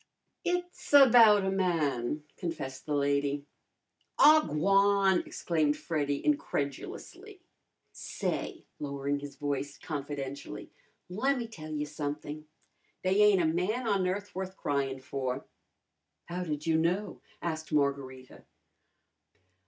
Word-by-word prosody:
"It's 355 -3 -3
about 230 -7 +8
a 190 - +1
man," 150 -7 0
confessed 150 -7 -5
the 150 - 0
lady. 140 0 0 0.7
"Aw, 310 +1 +7
g'wan!" 195 +4 +3
exclaimed 155 -3 0
Freddy 145 -4 -2
incredulously. 145 - -3 0.5
"Say," - - -4
lowering 140 0 -2
his 145 0 -9
voice 145 0 -3
confidentially, 140 -2 -6 0.4
"lemme 245 +7 0
tell 155 -9 -10
you 150 -1 -2
something! 150 0 -5 0.6
They 190 +2 +3
ain't 205 -4 +5
a - - +2
man 185 +10 0
on 195 -3 +2
earth 200 +3 -3
worth 190 0 -5
crying 135 -2 -1
for." 130 0 -3 0.8
"How 180 +1 -4
did 150 -2 -4
you 160 -1 +3
know?" 180 +6 -1 0.2
asked 160 -2 -4
Margarita. 140 -3 -2
155 Hz, 110 wpm, -30 LUFS, 140-195 Hz, 0.8 s, about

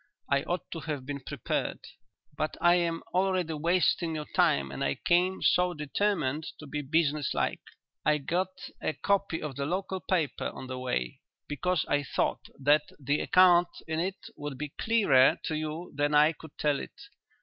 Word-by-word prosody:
I 140 0 +4
ought 175 +1 -3
to 165 - -4
have 150 -5 -4
been 140 +1 -4
prepared. 130 - -3 0.6
But 155 - -2
I 175 0 +5
am 170 -2 0
already 185 -3 +1
wasting 165 +1 +1
your 150 -1 -4
time 70 - +2
and 70 - -4
I 70 0 0
came 180 +2 +1
so 180 0 +3
determined 150 -1 -1
to 155 - -10
be 150 +1 -4
business 150 0 +1
like. - - 0 0.4
I 150 0 +3
got 175 +6 0 0.3
a - - -1
copy 200 0 0
of 145 -4 -5
the 140 0 -2
local 190 +2 -2
paper 165 -8 -1
on - - -7
the 130 0 -5
way, 60 - -3 0.3
because 160 +3 0
I 145 - +2
thought 140 - -1
that 145 +2 +3
the 145 +2 0
account 180 -1 +5 0.2
in 160 0 -1
it 185 +3 -1 0.2
would 145 -2 -6
be 150 +1 -4
clearer 145 - +4
to 155 - -2
you 155 +3 -4
than 145 +1 +1
I 150 +2 +6
could 160 -1 -14
tell 145 -2 +1
it. - - -9
155 Hz, 175 wpm, -29 LUFS, 145-175 Hz, 0.6 s, I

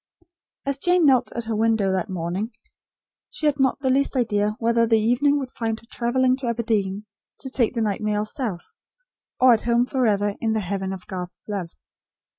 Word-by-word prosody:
As 275 0 0
Jane 355 +1 +3
knelt 260 -4 +4
at 235 - -3
her 225 0 -3
window 220 -3 +2
that 190 +1 -1
morning, 185 +5 -3 0.8
she 330 - -5
had 290 -2 +2
not 265 -1 +2
the 260 -2 +1
least 275 +1 +1
idea 210 -4 +1
whether 230 0 +2
the 225 0 +4
evening 245 +7 +2
would 265 -3 -4
find 225 -1 -3
her - - -20
travelling 255 +2 +2
to 265 -2 -4
Aberdeen, 215 -4 -1 0.4
to 265 - -7
take 250 -2 +1
the 230 - +1
night 210 0 -1
mail 210 0 0
south; 215 -6 -5 0.7
or 255 -1 +7
at 225 - +1
home 235 +1 +2
forever 210 -6 +1
in 225 -1 +1
the 220 - +1
heaven 190 -1 -3
of 190 -1 -7
Garth's 180 -2 -7
love. 195 -5 -3
225 Hz, 190 wpm, -23 LUFS, 205-255 Hz, 0.8 s, or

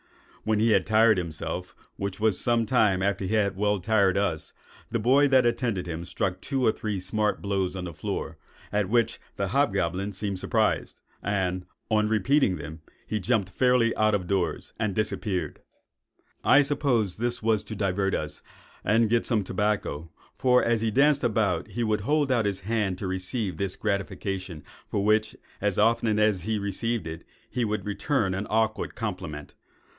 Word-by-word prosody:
When 110 0 +1
he 115 +1 +3
had - - +3
tired 110 -1 +5
himself, 85 +1 -5 0.2
(which 100 0 -4
was 110 -3 +2
some 120 -1 +2
time 105 -7 +2
after 100 -1 0
he 105 +4 0
had 100 -3 +1
well 105 +1 +1
tired 100 -1 +2
us,) 85 -6 -1 0.4
the - - 0
boy 130 +6 +4
that 130 -2 +4
attended 115 -6 0
him 85 0 -4
struck 90 +1 -2
two 135 -3 -1
or - - +5
three 105 -2 -3
smart 105 +3 -1
blows 95 -2 -1
on 95 - -4
the 85 -2 -6
floor, - - -4 0.3
at 105 -2 0
which 115 0 +1 0.2
the - - -2
hobgoblin 95 +4 0
seemed 100 -1 -3
surprised; - - 0 0.2
and, 95 -3 -1 0.2
on 105 0 +3
repeating 110 0 +2
them, 80 0 -8 0.2
he 110 - -2
jumped 105 -3 0
fairly 125 +1 +3
out 110 -1 +3
of 95 -3 -2
doors 90 -2 -2
and 105 -4 -1
disappeared. 100 -3 -2 0.8
"I 145 - +6
suppose 135 -8 0
this 120 0 -2
was 110 -2 +2
to 110 - -6
divert 95 -1 0
us, 75 -1 -5 0.4
and 110 +1 +3
get 120 -1 +2
some 110 -4 +1
tobacco; 95 -5 -2 0.3
for, 125 -1 +3
as 115 -1 +1
he 115 - +1
danced 140 +5 +3
about, 105 -7 +1
he 120 - -3
would 110 -2 0
hold 145 +4 +1
out 120 -4 +2
his 100 -2 -1
hand 105 -2 -1
to - - -5
receive 95 0 -3
this 95 0 -2
gratification, 95 -4 -3 0.2
for 100 - -1
which, 110 +1 +2 0.3
as 105 -2 0
often 110 0 +3
as 105 -3 +2
he 110 -1 0
received 100 +1 -2
it, 80 0 -6 0.2
he 125 - -2
would 105 -1 -2
return 105 -1 0
an 95 +2 -3
awkward 110 0 0
compliment. 90 - -5
105 Hz, 175 wpm, -26 LUFS, 95-115 Hz, 0.8 s, I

